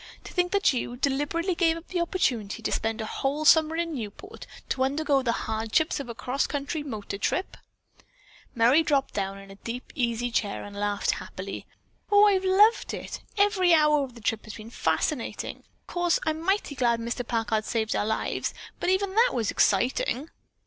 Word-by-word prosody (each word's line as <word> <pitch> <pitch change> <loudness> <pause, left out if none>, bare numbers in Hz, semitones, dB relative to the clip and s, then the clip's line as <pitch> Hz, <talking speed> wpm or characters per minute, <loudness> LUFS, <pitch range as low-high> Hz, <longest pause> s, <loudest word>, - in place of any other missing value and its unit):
"To - - -10
think 360 -1 +1
that 400 -7 +3
you 245 -1 -3
deliberately 290 +7 0
gave 330 -1 +2
up 330 - -12
the 355 -2 -1
opportunity 240 - -1
to - - -1
spend 225 0 -1
a - - -3
whole 285 +6 -2
summer 315 0 +6
in 335 0 -1
Newport 255 - -8 0.2
to 260 - +1
undergo 280 +1 +1
the 245 -3 +1
hardships 225 +9 0
of 275 -3 -6
a 235 - -5
cross 255 +4 -1
country 285 +2 -3
motor 215 -8 -5
trip." 370 - -1 1.0
Merry 245 +7 +5
dropped 285 -4 +1
down 195 -1 -2
in 195 0 -12
a 195 - -12
deep 240 +2 -6
easy 240 -1 -1
chair 205 -3 -1
and 205 0 -9
laughed 205 0 0
happily. - - -6 0.4
"Oh, 410 0 +7
I've 390 -2 +3
loved 410 +4 +4
it! - - -7 0.2
Every 390 -4 +4
hour 300 -2 +4
of 255 -3 -8
the 235 - -12
trip 215 +1 -1
has 215 - -8
been 220 +1 -10
fascinating. 230 - -1 0.2
Of - - -44
course 350 -1 +2
I'm 315 0 -1
mighty 385 -3 0
glad 240 -4 +1
Mr. 235 +2 -3
Packard 225 -2 -1
saved 220 -2 -1
our - - +1
lives, 220 - -2 0.2
but - - 0
even 380 +1 +1
that 465 +4 +4
was 225 -4 0
exciting." 250 - +1
270 Hz, 185 wpm, -27 LUFS, 225-335 Hz, 1.0 s, Oh